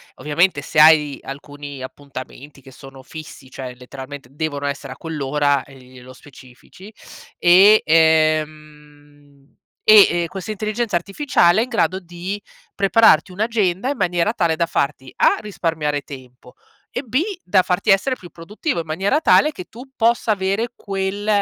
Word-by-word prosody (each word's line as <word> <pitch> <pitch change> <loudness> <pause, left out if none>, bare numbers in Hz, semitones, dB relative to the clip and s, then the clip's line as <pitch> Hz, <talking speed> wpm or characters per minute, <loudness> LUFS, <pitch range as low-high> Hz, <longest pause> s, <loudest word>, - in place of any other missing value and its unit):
Ovviamente 150 +1 0
se 150 - -1
hai 150 -2 +5
alcuni 145 0 -9
appuntamenti 140 +1 -10
che 135 - -15
sono 135 0 -14
fissi, 150 -2 -11
cioè, 125 -2 -8
letteralmente 130 +1 -10
devono 145 -1 -4
essere 140 -1 -5
a - - -19
quell'ora, 145 -3 -1
ehm, 135 -2 -16
glielo 130 0 -15
specifici 130 - -16 0.5
e 195 +5 +6
ehm, 150 -3 -1 0.3
e 195 -5 +6
questa 190 +4 -6
intelligenza 215 0 -3
artificiale 195 - +2
è - - +3
in 250 - -8
grado 190 -5 0
di 180 +3 -7 0.3
prepararti 195 -3 +3
un'agenda, 210 0 -1
in 285 - -3
maniera 175 +1 0
tale, 170 -6 0
da 170 - 0
farti 140 -5 -3
A - - +4
risparmiare 160 -8 -2
tempo 125 -2 -13 0.4
e - - -1
B 255 0 -1 0.2
da 185 +1 +2
farti 185 +4 -1
essere 200 +7 +3
più 180 -7 -14
produttivo, 205 - -4
in 165 - -5
maniera 190 - 0
tale 305 -1 +4
che 180 - -9
tu 250 +4 -13
possa 230 -1 +1
avere 200 +4 -1
quel, 195 +1 -4
160 Hz, 145 wpm, -20 LUFS, 145-195 Hz, 0.5 s, e